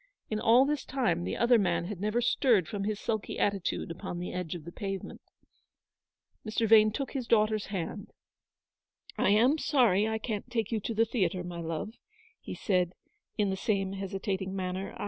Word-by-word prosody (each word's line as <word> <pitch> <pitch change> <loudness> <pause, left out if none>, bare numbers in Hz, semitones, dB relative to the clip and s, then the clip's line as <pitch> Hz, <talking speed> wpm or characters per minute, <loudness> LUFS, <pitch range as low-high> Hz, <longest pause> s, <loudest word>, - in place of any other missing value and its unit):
In 215 - 0
all 240 +5 +5
this 290 -1 -1
time 200 -11 0
the - - -3
other 235 0 +5
man 175 -3 +1
had 190 -1 -6
never 215 +3 +1
stirred 230 - +3
from 200 -1 -3
his 210 -1 -2
sulky 220 -2 -3
attitude 195 -4 -1
upon 175 +1 -6
the 175 +1 -5
edge 180 -2 -3
of 160 -3 -8
the 170 - -7
pavement. 195 +1 -5 1.2
Mr. 220 +1 0
Vane 215 0 +7
took 270 +4 -4
his 260 -4 -4
daughter's 215 -1 +2
hand. 200 +2 -5 0.6
" - - -64 0.3
I - - +3
am 245 +9 +4
sorry 220 -10 +3
I 220 0 -1
can't 220 +1 -4
take 225 -3 -2
you 225 - 0
to 225 +2 -4
the 225 +2 +4
theatre, 185 -6 -1
my 175 -1 -6
love," 165 +6 -4 0.5
he - - -7
said, 180 -3 0 0.4
in 205 -2 +1
the - - -1
same 195 -1 -1
hesitating 195 0 -3
manner. 185 0 -4
205 Hz, 185 wpm, -30 LUFS, 185-225 Hz, 1.2 s, Vane